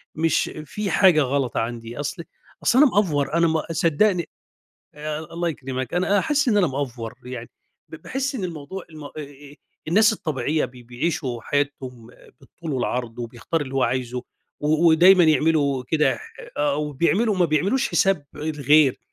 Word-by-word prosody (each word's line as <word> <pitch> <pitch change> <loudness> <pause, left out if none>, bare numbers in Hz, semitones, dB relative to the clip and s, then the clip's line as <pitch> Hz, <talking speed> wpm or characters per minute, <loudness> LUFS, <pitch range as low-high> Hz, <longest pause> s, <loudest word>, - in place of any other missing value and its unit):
مش 165 +1 +1
في 205 +6 -4
حاجة 180 -6 +5
غلَط 135 -2 -1
عندي"، 115 +1 -4
أصل 155 +4 -4 0.4
أصل 255 +1 +4
أنا 300 - +8
مأفور، 155 - +1
أنا 170 0 +3
ما 160 -1 0
صدِّقني 170 +3 +1 1.0
الله 170 0 -1
يكرِمَك، 130 -3 -4
أنا 190 +3 +2
حاسس 295 -3 +1
إن 210 - +3
أنا 190 -4 +4
مأفور 130 -5 -4
يعني. 125 -2 -7 0.4
ب - - -9
باحس 270 +1 -3
إن 215 -8 -3
الموضوع 170 +2 -6
الم 155 -2 -10
آآ، - - -8 0.8
الناس 215 +6 +5
الطبيعية 155 -4 -1
بي 125 -1 -10
بيعِيشوا 125 +1 -3
حياتهم 130 -5 -3 0.3
بالطول 155 +3 -8
والعرض، 120 -2 -2
وبيختار 120 +7 -3
اللي 135 -2 -5
هو 135 - +2
عايزه، 125 -1 -1 0.4
و 155 +3 +3
ودايمًا 175 +3 +7
يعملوا 150 -3 +2
كده 150 -4 +2
ح - - -12 0.4
آه، 145 -1 +1
وبيعملوا 170 - +1
ما 180 - +3
بيعملوش 185 - +1
حساب 190 -7 +2
الغير، 150 -2 +3
150 Hz, 150 wpm, -23 LUFS, 130-175 Hz, 1.0 s, أنا